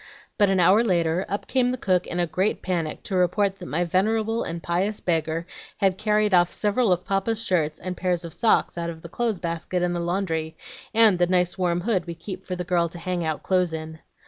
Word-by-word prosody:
But 205 -1 +5
an 190 -1 +2
hour 190 +6 +5
later, 175 -3 +1
up 200 - -3
came 255 -2 +1
the 255 - -2
cook 185 -6 +1
in 175 - -3
a 175 - +3
great 185 +5 -1
panic 170 -4 -2
to 195 - -4
report 195 +2 +1
that 180 - -8
my 165 +4 0
venerable 220 +5 +1
and 165 0 -5
pious 190 +5 -1
beggar 165 -1 -1 0.3
had 190 -2 +1
carried 210 -1 +2
off 175 -1 +4
several 210 +1 +1
of 180 0 +1
Papa's 215 +3 0
shirts 155 -4 0
and 185 0 -5
pairs 180 -2 -1
of 165 - -7
socks 220 -5 +2
out 170 0 -2
of 160 -1 -9
the 170 - -8
clothes 225 0 -1
basket 170 +1 -2
in 175 0 0
the 175 - -2
laundry, 170 -3 -2 0.3
and 220 -5 +5
the 175 - +3
nice 180 -1 +2
warm 175 -2 0
hood 190 -4 0
we 170 - -5
keep 185 +3 -8
for 185 - -4
the 180 - -3
girl 175 -1 +1
to 175 - -10
hang 175 0 -2
out 155 -2 -2
clothes 180 -3 +1
in. 160 0 -6
180 Hz, 225 wpm, -24 LUFS, 170-200 Hz, 0.3 s, But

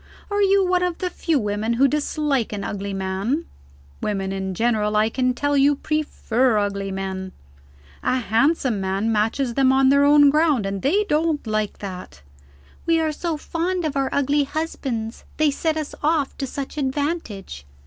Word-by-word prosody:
Are 410 0 +1
you 395 -1 +4
one 360 0 +2
of 360 -2 -1
the 365 -1 -3
few 330 -3 0
women 210 0 -1
who 265 +4 +4
dislike 290 -3 0
an 205 -2 -4
ugly 200 0 -4
man? 195 - -2 0.6
Women 195 -2 -2
in 190 -1 -3
general, 215 -1 +1
I 215 +1 +3
can 255 0 0
tell 285 +3 0
you, 285 +1 +4
prefer 260 -6 0
ugly 200 -1 -1
men. 190 -1 -4 0.7
A - - +1
handsome 245 -1 +1
man 195 +4 0
matches 225 +4 0
them 265 +1 +4
on 265 0 +4
their 280 +1 +5
own 290 0 +6
ground, 300 -7 +2
and 195 0 -3
they 385 +10 +2
don't 315 -5 0
like 215 -1 -1
that. 180 - -8 0.6
'We 330 -1 +4
are 315 -1 +1
so 325 +1 -3
fond 345 +3 -2
of 300 -2 -2
our 270 -1 +1
ugly 285 +1 +2
husbands; 270 -7 -4
they 310 -1 +3
set 315 +2 -1
us 310 -2 -4
off 300 -2 +1
to 270 - -2
such 280 +3 -5
advantage.' 265 - -3
265 Hz, 170 wpm, -22 LUFS, 210-305 Hz, 0.7 s, own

